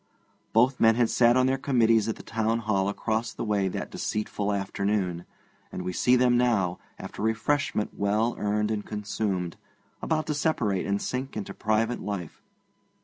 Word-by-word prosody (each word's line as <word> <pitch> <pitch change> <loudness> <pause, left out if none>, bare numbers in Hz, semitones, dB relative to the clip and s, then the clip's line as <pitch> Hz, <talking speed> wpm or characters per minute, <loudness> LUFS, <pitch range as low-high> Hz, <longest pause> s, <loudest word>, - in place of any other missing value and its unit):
Both 125 +4 +3
men 115 0 +5
had 120 -1 +2
sat 120 0 +4
on 130 - +4
their 130 0 +1
committees 115 -5 +3
at 110 - -1
the - - -12
Town 115 0 0
Hall 105 -4 0
across 110 +3 -2
the - - -5
way 100 -2 +1
that 95 - -4
deceitful 105 -1 -2
afternoon, 100 -3 -1 0.5
and 90 - -5
we 90 0 -3
see 125 +7 +3
them 125 -1 +4
now, 100 -8 +1 0.2
after - - -8
refreshment 110 +1 0
well 105 +4 +1
earned 105 +1 0
and 105 -1 -2
consumed, 100 -4 -3 0.4
about 155 -1 0
to 155 - -1
separate 125 - 0
and 100 0 0
sink 130 +1 -4
into 105 - -5
private 110 +2 0
life. 95 -5 -5
110 Hz, 165 wpm, -27 LUFS, 100-120 Hz, 0.5 s, men